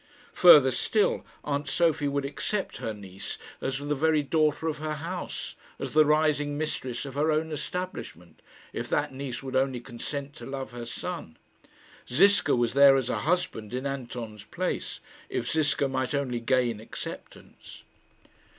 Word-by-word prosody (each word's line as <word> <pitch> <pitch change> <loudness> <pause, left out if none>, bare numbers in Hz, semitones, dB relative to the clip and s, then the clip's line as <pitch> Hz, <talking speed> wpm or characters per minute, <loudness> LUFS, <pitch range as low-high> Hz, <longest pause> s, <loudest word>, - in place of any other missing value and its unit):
Further 150 -7 +8
still, 205 - +1 0.2
aunt 145 0 -2
Sophie 160 0 +2
would 140 0 -1
accept 190 +8 -2
her 115 - -3
niece 100 -2 -7 0.2
as 135 0 -1
the 145 +1 -2
very 155 +1 +2
daughter 155 +1 +1
of 155 -2 -2
her 155 0 -2
house, 170 +4 -5 0.2
as - - -5
the 155 0 +6
rising 150 -1 +2
mistress 130 -5 -3
of 135 - -7
her 150 +3 +2
own 155 +1 0
establishment, 120 - -5 0.3
if - - -4
that - - 0
niece 130 -2 -5
would 130 -1 -5
only 130 -1 +2
consent 135 +4 -6
to - - -9
love 135 -1 -5
her 120 -1 -6
son. 115 - -6 0.7
Ziska 170 +2 +5
was 120 -1 +1
there 140 0 +8
as 130 -2 0
a - - -1
husband 135 - -1
in 130 +2 -3
Anton's 120 -6 -5
place, - - -3 0.3
if - - -2
Ziska 145 -3 +2
might 130 +1 -1
only 130 -4 -1
gain 120 -2 +1
acceptance. 110 - -9
140 Hz, 155 wpm, -28 LUFS, 125-155 Hz, 0.7 s, Further